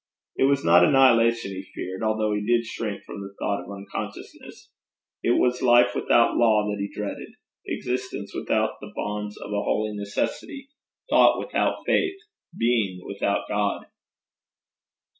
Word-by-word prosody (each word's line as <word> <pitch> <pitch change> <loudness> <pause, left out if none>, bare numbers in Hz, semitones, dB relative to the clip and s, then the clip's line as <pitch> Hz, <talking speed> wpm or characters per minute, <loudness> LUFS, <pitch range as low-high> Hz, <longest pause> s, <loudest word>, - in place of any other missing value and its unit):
It - - +3
was 140 -5 +2
not 85 +1 +6
annihilation 115 -2 +4
he 95 -1 -5
feared, 95 +1 -5
although 110 -1 0
he 105 0 -2
did 120 +2 +2
shrink 110 -2 -5
from 100 - -8
the 100 0 -9
thought 100 0 -1
of - - -13
unconsciousness; 100 0 -8 0.5
it 120 - +2
was 125 0 +1
life 120 -1 +5
without 115 - +3
law 110 -3 +3
that 105 - -4
he 100 - -4
dreaded, - - -6 0.3
existence 125 -5 -4
without - - -1
the - - -9
bonds 105 0 -4
of - - -8
a 100 0 0
holy 105 0 -1
necessity, 255 - -4 0.4
thought - - +6
without - - -1
faith, 390 -1 +1 0.4
being 110 -6 0
without 100 0 -2
God. 105 -1 -1
105 Hz, 145 wpm, -25 LUFS, 100-120 Hz, 0.5 s, not